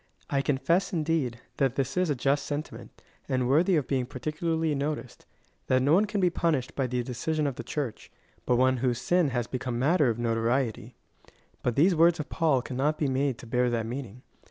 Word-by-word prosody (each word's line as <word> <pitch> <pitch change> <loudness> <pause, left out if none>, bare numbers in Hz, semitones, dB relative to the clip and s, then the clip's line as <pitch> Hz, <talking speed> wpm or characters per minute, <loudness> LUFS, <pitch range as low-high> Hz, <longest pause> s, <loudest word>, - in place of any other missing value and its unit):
I 140 -1 +2
confess, 165 +7 +1
indeed, 155 -7 0 0.2
that 135 -4 +1
that 135 -1 -1
is 180 -2 +1
a 145 - +1
just 135 +2 0
sentiment,^ 145 +1 -5 0.4
and 130 -1 +1
worthy 165 +8 +3
of 150 -5 0
being 130 -3 0
particularly 155 +4 -2
noticed 140 -2 -4 0.2
— - - -41
that 130 0 +3
no 145 +3 +4
one 200 +5 +5
can 210 -1 -2
be 180 -2 +3
punished 155 -7 0
by 135 -2 -1
the 125 0 -1
decision 150 +5 -2
of 140 - 0
the - - -7
Church, 140 -7 -5 0.4
but 125 - +3
one 130 +1 +3
whose 120 -1 0
sin 175 +6 +2
has 120 -2 -1
become 125 0 -4
matter 145 +2 +3
of 115 - -1
notoriety; 115 0 -1 0.7
but 120 - -1
these 175 +6 +4
words 170 +1 +4
of 150 - -5
Paul 150 -6 +1
cannot 140 +5 -1
be 150 - 0
made 130 -1 0
to - - -11
bear 125 +1 +1
that 115 -2 -1
meaning. 125 0 -6
135 Hz, 205 wpm, -28 LUFS, 125-155 Hz, 0.7 s, one